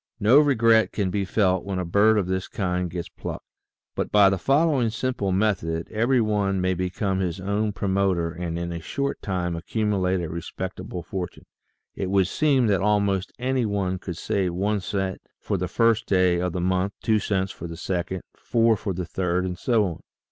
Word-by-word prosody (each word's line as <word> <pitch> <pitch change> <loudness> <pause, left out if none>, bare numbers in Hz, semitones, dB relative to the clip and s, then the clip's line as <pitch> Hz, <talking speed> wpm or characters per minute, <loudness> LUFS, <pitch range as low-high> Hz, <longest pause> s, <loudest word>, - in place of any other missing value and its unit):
No 115 +8 +6
regret 115 -6 +4
can 95 -3 -1
be 100 0 -1
felt 95 -2 +1
when 100 -1 -3
a 90 - -2
bird 105 +5 +4
of 100 - +1
this 95 0 -2
kind 90 -2 -2
gets 85 0 -5
plucked. - - -7 0.5
But - - -3
by 100 -2 +6
the 95 - -1
following 140 - +2
simple 110 -3 -2
method 90 -5 0
every 120 +4 +2
one 105 -3 +1
may 95 0 +1
become 95 +2 -1
his 90 -1 -2
own 100 +3 -1
promoter 95 -4 0
and 85 -1 -4
in 85 0 -3
a 85 - -4
short 140 - -3
time 90 -3 -2
accumulate 95 0 0
a 85 - -3
respectable 90 +4 -6
fortune. 90 0 -6 0.5
It 95 - -3
would 95 -1 +3
seem 135 - +2
that 100 -4 +2
almost 100 -2 +1
any 125 -1 0
one 95 -2 -1
could 90 -2 -6
save 90 -3 -1
one 100 +3 0
cent 95 0 -3 0.2
for - - -2
the 90 -1 -1
first 115 +4 +2
day 90 -2 +3
of 90 0 -1
the 90 - -2
month, 95 +2 0
two 110 -1 +3
cents 95 -2 -1
for 85 - -8
the 85 0 -8
second, 90 0 -3
four 115 -1 +2
for 100 -1 -3
the 90 0 -3
third, 90 +1 -1
and 90 -1 -3
so 110 +2 +2
on. 85 -4 -4
95 Hz, 190 wpm, -24 LUFS, 90-105 Hz, 0.5 s, No